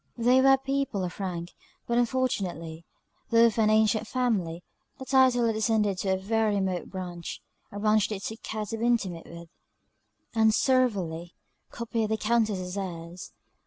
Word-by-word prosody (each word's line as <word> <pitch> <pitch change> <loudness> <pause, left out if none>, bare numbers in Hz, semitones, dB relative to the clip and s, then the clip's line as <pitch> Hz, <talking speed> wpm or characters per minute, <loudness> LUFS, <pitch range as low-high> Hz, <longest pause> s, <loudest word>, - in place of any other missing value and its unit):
They 245 +2 +4
were 270 0 +6
people 270 -6 -2
of 180 +2 -5
rank; 175 -3 -4 0.3
but 235 0 +1
unfortunately, 185 - -2 0.4
though 230 0 +6
of 230 -1 +1
an 215 -1 +4
ancient 215 0 +3
family, 195 -10 -1 0.3
the 265 - -8
title 260 -3 +4
had 225 - +2
descended 215 -3 +1
to 190 0 0
a - - -2
very 215 +2 0
remote 190 -3 -2
branch 175 -3 -6 0.3
a 205 - -7
branch 215 0 +2
they 210 - -3
took 220 +4 -7
care 215 -1 -4
to 225 +3 -5
be 235 - +1
intimate 190 -8 -1
with; 170 0 -11 0.8
and 220 -1 +4
servilely 190 -11 0 0.3
copied 230 -2 -2
the 220 - 0
Countess's 210 -5 0
airs. 175 -2 -7
215 Hz, 160 wpm, -27 LUFS, 185-235 Hz, 0.8 s, were